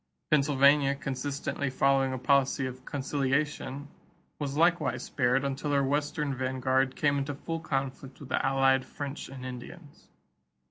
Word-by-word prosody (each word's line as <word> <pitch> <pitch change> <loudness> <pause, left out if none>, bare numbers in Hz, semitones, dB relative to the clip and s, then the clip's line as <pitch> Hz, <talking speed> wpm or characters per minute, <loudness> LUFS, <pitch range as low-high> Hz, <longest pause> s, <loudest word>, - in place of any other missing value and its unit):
Pennsylvania, 140 -1 +4
consistently 140 +1 -3
following 135 0 +2
a 130 - -2
policy 135 +1 +2
of 130 0 -7
conciliation, 140 0 -2 0.5
was 145 -1 -3
likewise 165 -4 +2
spared 125 +1 +1
until 140 +2 -2
her 140 -1 +3
western 145 +1 -1
vanguard 130 0 0
came 145 -1 +2
into 140 +1 -3
full 165 +3 -4
conflict 135 -3 -4
with 140 - -10
the - - 0
allied 135 -1 +3
French 145 +1 -6
and 130 -1 -8
Indians. 130 +5 -10
135 Hz, 135 wpm, -29 LUFS, 130-145 Hz, 0.5 s, Pennsylvania